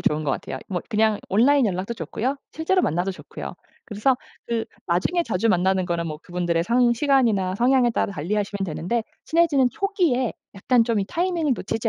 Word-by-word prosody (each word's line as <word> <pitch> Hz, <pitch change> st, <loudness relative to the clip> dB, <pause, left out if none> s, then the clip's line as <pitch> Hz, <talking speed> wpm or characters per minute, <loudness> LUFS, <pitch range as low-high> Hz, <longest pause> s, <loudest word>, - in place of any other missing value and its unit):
좋은 150 Hz, +1 st, +1 dB
것 140 Hz, -, 0 dB
같아요. 130 Hz, -, -4 dB
뭐 180 Hz, -3 st, -2 dB
그냥 220 Hz, -2 st, +2 dB
온라인 255 Hz, +6 st, +4 dB
연락도 190 Hz, +3 st, -2 dB
좋고요. 260 Hz, +5 st, -3 dB, 0.2 s
실제로 365 Hz, +4 st, +1 dB
만나도 175 Hz, +5 st, 0 dB
좋고요. -, -, -8 dB, 0.3 s
그래서 230 Hz, +4 st, +1 dB, 0.3 s
그 230 Hz, -1 st, -1 dB, 0.2 s
나중에 185 Hz, -, +1 dB
자주 210 Hz, +5 st, 0 dB
만나는 185 Hz, 0 st, +2 dB
거는 170 Hz, -2 st, -2 dB
뭐 155 Hz, -, -4 dB
그분들의 175 Hz, -2 st, -1 dB
상 240 Hz, +2 st, +3 dB
시간이나 230 Hz, -9 st, +2 dB
성향에 250 Hz, +1 st, +3 dB
따라 225 Hz, -, 0 dB
달리 175 Hz, +5 st, -3 dB
하시면 200 Hz, -1 st, -2 dB
되는데 185 Hz, +7 st, -2 dB, 0.2 s
친해지는 310 Hz, -6 st, +3 dB
초기에 340 Hz, -, 0 dB, 0.2 s
약간 230 Hz, +5 st, +3 dB
좀 230 Hz, -3 st, 0 dB
이 -, -, -1 dB
타이밍을 340 Hz, -, 0 dB
놓치지 225 Hz, +4 st, -2 dB
225 Hz, 415 characters per minute, -23 LUFS, 185-260 Hz, 0.3 s, 온라인